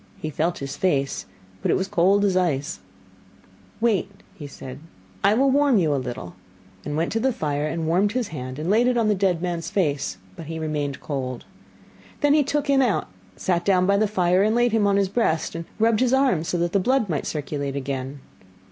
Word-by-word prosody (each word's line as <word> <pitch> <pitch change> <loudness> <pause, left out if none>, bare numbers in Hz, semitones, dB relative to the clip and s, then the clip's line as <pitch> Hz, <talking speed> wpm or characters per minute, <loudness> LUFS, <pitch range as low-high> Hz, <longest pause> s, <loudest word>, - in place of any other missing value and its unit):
He 155 - -4
felt 165 +4 -1
his 140 0 -5
face, 140 -7 0 0.3
but - - -1
it - - +3
was 190 - -2
cold 195 +4 +3
as 190 -2 +1
ice. 155 -6 0 1.0
'Wait,' 220 -4 +1 0.4
said 130 -2 -9
he, 145 - -16 0.5
'I - - +4
will 270 +3 +3
warm 280 -3 +4
you 160 -6 +2
a 135 - 0
little,' 120 -8 -6 0.5
and 150 0 -3
went 165 +2 0
to 225 - 0
the 265 +3 +2
fire 150 - -2
and 165 +1 -3
warmed 185 +6 +2
his 245 -4 -1
hand 130 -4 -6
and 155 +2 -4
laid 225 +6 +3
it 250 -1 +2
on 225 -2 +2
the - - +4
dead 185 -3 0
man's 170 -1 -2
face, 155 -8 -1 0.2
but 160 - -9
he 165 0 -5
remained 150 -3 -3
cold. 130 -4 -4 0.8
Then 290 -1 +4
he 300 - +5
took 290 +1 -1
him 275 -1 +4
out, 240 -7 +1 0.2
and - - -19
sat 175 -2 +1
down 185 -1 +3
by 200 +1 +3
the 215 +1 +2
fire 185 -2 +2
and 215 +2 +2
laid 240 0 +3
him 215 -2 +2
on 200 0 +3
his 200 -1 +2
breast 190 -6 0
and 165 0 -5
rubbed 225 0 +3
his 255 0 +2
arms 245 - +1
that 175 -1 0
the 200 - +4
blood 250 +3 +2
might 155 -6 -2
circulate 145 -2 -3
again. 135 0 -4
180 Hz, 215 wpm, -23 LUFS, 150-215 Hz, 1.0 s, he